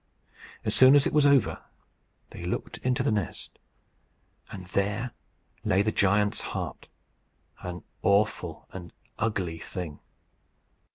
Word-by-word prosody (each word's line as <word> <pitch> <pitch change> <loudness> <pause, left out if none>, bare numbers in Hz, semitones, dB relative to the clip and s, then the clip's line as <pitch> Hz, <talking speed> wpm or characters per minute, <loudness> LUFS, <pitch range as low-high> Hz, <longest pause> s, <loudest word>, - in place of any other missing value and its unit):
As - - 0
soon 130 +2 +8
as 145 - +5
it - - 0
was 150 -1 +5
over, 140 -3 +3 0.7
they - - -8
looked - - -4
into 125 +1 0
the 130 - +2
nest, 105 -5 -3 0.9
and 90 - -7
there 105 +6 -1 0.5
lay 95 +2 +3
the 110 - +1
giant's 105 +1 +2
heart - - -5 0.7
an 90 -1 -6 0.2
awful 100 -5 +1
and 90 -2 -8 0.3
ugly 95 -7 -1
thing. 85 -5 -6
100 Hz, 120 wpm, -28 LUFS, 90-120 Hz, 0.9 s, soon